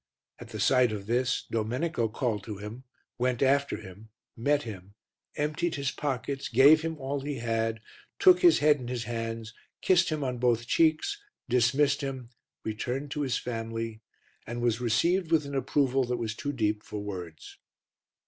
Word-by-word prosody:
At 120 Hz, -, -10 dB
the 110 Hz, -2 st, -7 dB
sight 125 Hz, +3 st, +4 dB
of 100 Hz, -2 st, -5 dB
this, 120 Hz, +3 st, 0 dB
Domenico 120 Hz, +4 st, -1 dB
called 110 Hz, -2 st, -2 dB
to 105 Hz, -2 st, -6 dB
him, 105 Hz, +6 st, -8 dB, 0.3 s
went 125 Hz, +1 st, +1 dB
after 140 Hz, +1 st, +2 dB
him, 100 Hz, +4 st, -12 dB, 0.3 s
met 145 Hz, +5 st, +1 dB
him, 100 Hz, -3 st, -9 dB, 0.4 s
emptied 150 Hz, +3 st, -1 dB
his 140 Hz, -2 st, -1 dB
pockets, 135 Hz, -1 st, -3 dB
gave 140 Hz, +6 st, +7 dB
him 160 Hz, 0 st, -3 dB
all 140 Hz, 0 st, -3 dB
he 145 Hz, +1 st, -3 dB
had, 115 Hz, -2 st, -1 dB, 0.4 s
took 370 Hz, -3 st, +6 dB
his 350 Hz, -2 st, +6 dB
head 150 Hz, -1 st, +4 dB
in 125 Hz, -, -7 dB
his 120 Hz, -1 st, -3 dB
hands, 115 Hz, -1 st, -4 dB, 0.3 s
kissed 180 Hz, -1 st, +3 dB
him 155 Hz, -2 st, -2 dB
on 125 Hz, -2 st, -2 dB
both 120 Hz, -1 st, +2 dB
cheeks, 165 Hz, -, +2 dB, 0.3 s
dismissed 135 Hz, +4 st, +3 dB
him, 130 Hz, -3 st, -5 dB, 0.3 s
returned 125 Hz, +6 st, -3 dB
to 150 Hz, -, -2 dB
his 135 Hz, -4 st, 0 dB
family 115 Hz, -1 st, -4 dB, 0.5 s
and 120 Hz, +1 st, -4 dB
was 120 Hz, -1 st, 0 dB
received 170 Hz, -, +1 dB
with 155 Hz, -3 st, +3 dB
an 140 Hz, -, -7 dB
approval 135 Hz, 0 st, +1 dB
that 125 Hz, 0 st, -2 dB
was 115 Hz, -2 st, -3 dB
too 145 Hz, +6 st, -4 dB
deep 105 Hz, -5 st, 0 dB
for 105 Hz, -, -6 dB
words. 90 Hz, -6 st, -8 dB
125 Hz, 165 wpm, -28 LUFS, 115-145 Hz, 0.5 s, gave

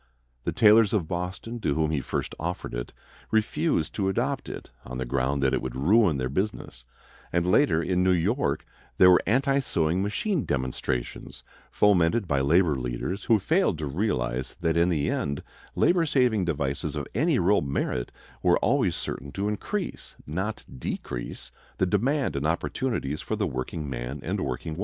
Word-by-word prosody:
The -, -, 0 dB
tailors 110 Hz, -1 st, +5 dB
of 95 Hz, -7 st, +1 dB
Boston, 90 Hz, +7 st, -4 dB
to 75 Hz, -10 st, 0 dB
whom 80 Hz, 0 st, +1 dB
he 75 Hz, -3 st, 0 dB
first -, -, -3 dB
offered 85 Hz, -3 st, -4 dB
it, -, -, -4 dB, 0.4 s
refused 110 Hz, -, +1 dB
to 95 Hz, -2 st, 0 dB
adopt 130 Hz, +8 st, -1 dB
it, -, -, -8 dB
on 65 Hz, 0 st, -7 dB
the 65 Hz, -, -2 dB
ground 70 Hz, +2 st, 0 dB
that 65 Hz, -, +2 dB
it -, -, +1 dB
would 65 Hz, -1 st, -5 dB
ruin 90 Hz, -, +4 dB
their 65 Hz, -1 st, -1 dB
business; 70 Hz, -, -3 dB, 0.5 s
and 85 Hz, 0 st, +1 dB
later, 85 Hz, -2 st, +3 dB
in 90 Hz, +1 st, +1 dB
New 95 Hz, -, +3 dB
York, 90 Hz, -, +1 dB, 0.3 s
there 90 Hz, 0 st, +8 dB
were 90 Hz, -, +6 dB
anti 135 Hz, +5 st, +3 dB
sewing 85 Hz, -, 0 dB
machine 145 Hz, -, -1 dB
demonstrations, 65 Hz, -2 st, -3 dB, 0.3 s
fomented 100 Hz, +1 st, +3 dB
by 70 Hz, -3 st, +1 dB
labor 80 Hz, +2 st, +3 dB
leaders, 65 Hz, -, -3 dB
who 115 Hz, -, +5 dB
failed 160 Hz, -, +1 dB
to 75 Hz, -, -3 dB
realize 65 Hz, -, -2 dB
that 85 Hz, -1 st, +1 dB
in 85 Hz, +1 st, +3 dB
the 75 Hz, -5 st, 0 dB
end 70 Hz, 0 st, -2 dB, 0.3 s
labor 170 Hz, -2 st, +3 dB
saving 125 Hz, -9 st, +2 dB
devices 70 Hz, -4 st, -2 dB
of -, -, -3 dB
any -, -, +2 dB
real 100 Hz, +4 st, +3 dB
merit 70 Hz, -3 st, -2 dB, 0.3 s
were -, -, +4 dB
always -, -, +2 dB
certain 70 Hz, -, -5 dB
to 100 Hz, +1 st, -1 dB
increase, 180 Hz, -, -4 dB
not 95 Hz, +8 st, -3 dB
decrease, -, -, -5 dB, 0.3 s
the 95 Hz, -, +2 dB
demand 120 Hz, -, +1 dB
and 70 Hz, +2 st, 0 dB
opportunities 85 Hz, -, -2 dB
for -, -, -3 dB
the -, -, 0 dB
workingman 65 Hz, 0 st, -4 dB
and -, -, -2 dB
workingwoman. 80 Hz, +6 st, -4 dB
85 Hz, 165 wpm, -26 LUFS, 70-105 Hz, 0.5 s, there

